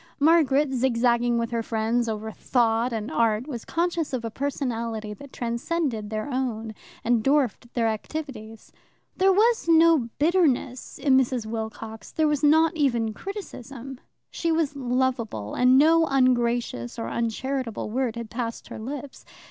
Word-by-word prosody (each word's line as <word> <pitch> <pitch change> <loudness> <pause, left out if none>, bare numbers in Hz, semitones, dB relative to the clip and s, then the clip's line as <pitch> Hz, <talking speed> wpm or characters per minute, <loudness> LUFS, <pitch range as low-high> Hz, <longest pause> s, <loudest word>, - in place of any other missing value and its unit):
Margaret, 295 -2 +4
zigzagging 240 -1 +2
with 230 0 -2
her 230 -1 0
friends 225 +1 0
over 220 0 -4
Thought 235 +1 +1
and 220 -1 -4
Art, 225 0 +1
was 250 -6 -6
conscious 335 -3 -1
of 240 -3 -2
a 225 - -4
personality 230 -5 -3
that 275 +6 -12
transcended 235 -1 -2
their 215 +2 -3
own 240 -5 -3 0.3
and 235 -1 +2
dwarfed 270 -4 +1
their 230 -2 +2
activities. 225 -1 -6 0.5
There 385 0 +5
was 440 +1 +3
no 325 -6 +5
bitterness 290 -6 +1
in 270 -3 +3
Mrs. 255 -3 +1
Wilcox; 220 0 -6
there 315 -1 +1
was 295 -2 0
not 315 +3 +4
even 240 -7 +1
criticism; 270 - -8 0.3
she 335 - -1
was 320 -3 0
lovable, 250 - -1
and 250 +1 +5
no 325 +3 +5
ungracious 240 - +1
or 115 - -3
uncharitable 235 - -3
word 245 -1 -1
had 235 -2 -7
passed 230 -1 -4
her - - -7
lips. 270 +4 -7
245 Hz, 145 wpm, -25 LUFS, 225-285 Hz, 0.5 s, There